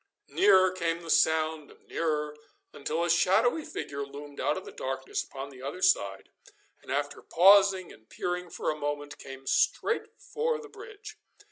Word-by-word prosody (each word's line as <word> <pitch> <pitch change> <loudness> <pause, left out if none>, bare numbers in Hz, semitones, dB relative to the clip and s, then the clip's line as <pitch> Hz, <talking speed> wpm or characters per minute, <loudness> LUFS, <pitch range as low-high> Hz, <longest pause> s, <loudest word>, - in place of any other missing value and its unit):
Nearer 190 - +5
came 170 -2 -2
the 165 - -3
sound 160 -1 +2
and - - -20
nearer, 150 -2 -1 0.4
until 155 +4 -2
a 175 - 0
shadowy 220 - +3
figure 140 - -5
loomed 140 +1 -10
out 150 - 0
of 190 - -7
the - - -9
darkness 130 0 -3
upon 140 +1 -8
the 130 -2 -13
other 145 +8 -5
side, 100 - +1 0.5
and - - -10
after 145 +1 -2
pausing 195 0 +5
and 110 0 -21
peering 180 0 -3
for - - -2
a - - -4
moment, 145 0 -4
came 135 0 -10
straight 450 - 0
for 470 +1 -2
the 440 -1 -11
bridge. 425 0 -11
160 Hz, 165 wpm, -29 LUFS, 140-190 Hz, 0.5 s, Nearer